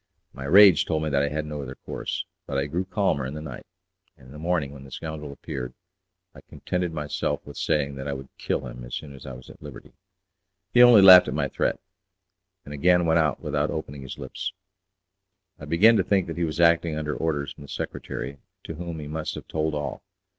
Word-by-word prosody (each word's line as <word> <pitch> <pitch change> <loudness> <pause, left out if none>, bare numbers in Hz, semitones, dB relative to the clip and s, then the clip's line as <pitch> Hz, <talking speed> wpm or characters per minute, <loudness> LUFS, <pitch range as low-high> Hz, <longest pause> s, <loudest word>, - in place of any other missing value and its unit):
My 65 - -7
rage 95 +4 +7
told 80 -2 -1
me 75 - -2
that 70 0 +2
I 70 - +1
had 75 +1 -3
no 75 -1 -5
other 65 -1 -7
course, - - -4 0.2
but 70 - -2
I 70 - +1
grew 85 +6 -2
calmer 95 -8 0
in 65 +3 -5
the - - -5
night, 70 -5 -9 0.5
and - - -18
in 65 - -14
the 75 - -10
morning, 80 -4 -1
when 70 -1 -11
the 70 - -12
scoundrel 75 +1 -6
appeared, 60 -3 -6 0.6
I - - -13
contented 90 -1 -3
myself 75 -2 -3
with 70 - -10
saying 70 -1 0
that 65 +1 -5
I 70 - -2
would 65 -1 -8
kill 65 - -2
him - - -8
as - - -6
soon 75 -2 -7
as 65 - -12
I 65 - -6
was 65 +1 -12
at - - -18
liberty. - - -11 0.8
He 120 - +7
only 120 -5 +9
laughed 95 -1 +10
at - - -3
my - - 0
threat, - - -1 0.9
and 70 - -8
again 90 +4 +3
went 80 0 +3
out 80 -3 +1
without - - -1
opening 70 0 -5
his 65 - -8
lips. 90 - -5 1.1
I 75 - -8
began 100 +9 +5
to - - +3
think 95 -3 +2
that 85 - -6
he 85 - +1
was 80 +1 -4
acting 85 -2 +3
under 75 -1 -2
orders 75 -4 -2
from - - -16
the 70 - -10
secretary, 70 0 -5 0.2
to - - -6
whom 85 0 -6
he 75 - -7
must 80 +1 -4
have - - -9
told 80 -1 -1
all. 75 -2 -4
75 Hz, 225 wpm, -25 LUFS, 70-85 Hz, 1.1 s, laughed